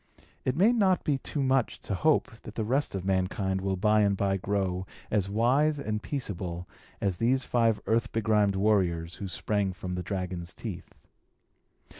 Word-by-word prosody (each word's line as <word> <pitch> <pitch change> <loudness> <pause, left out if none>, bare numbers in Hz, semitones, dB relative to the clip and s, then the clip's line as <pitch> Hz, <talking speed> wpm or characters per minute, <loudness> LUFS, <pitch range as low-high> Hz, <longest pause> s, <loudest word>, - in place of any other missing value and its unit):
It 130 - 0
may 200 +9 +5
not 190 -6 +3
be 140 -3 +1
too 140 +2 -3
much 130 -2 +1
to - - -3
hope 155 - +2
that 110 - -10
the 110 - -1
rest 130 0 0
of 95 -1 -4
mankind 95 0 0
will 95 0 0
by 105 +3 +3
and 100 -1 +2
by 100 -1 +1
grow 95 -1 -1 0.2
as 100 -3 +1
wise 130 +8 +3
and 110 -6 -2
peaceable 90 - -4 0.3
as 95 -3 -1
these 125 +6 +2
five 115 -3 +2
earth 115 +1 +1
begrimed 105 -3 +2
warriors, 90 -5 +1
who 100 - -3
sprang 100 +1 -1
from 90 0 -6
the 90 - -2
dragon's 90 -2 -4
teeth. - - -7
105 Hz, 170 wpm, -28 LUFS, 95-120 Hz, 0.3 s, may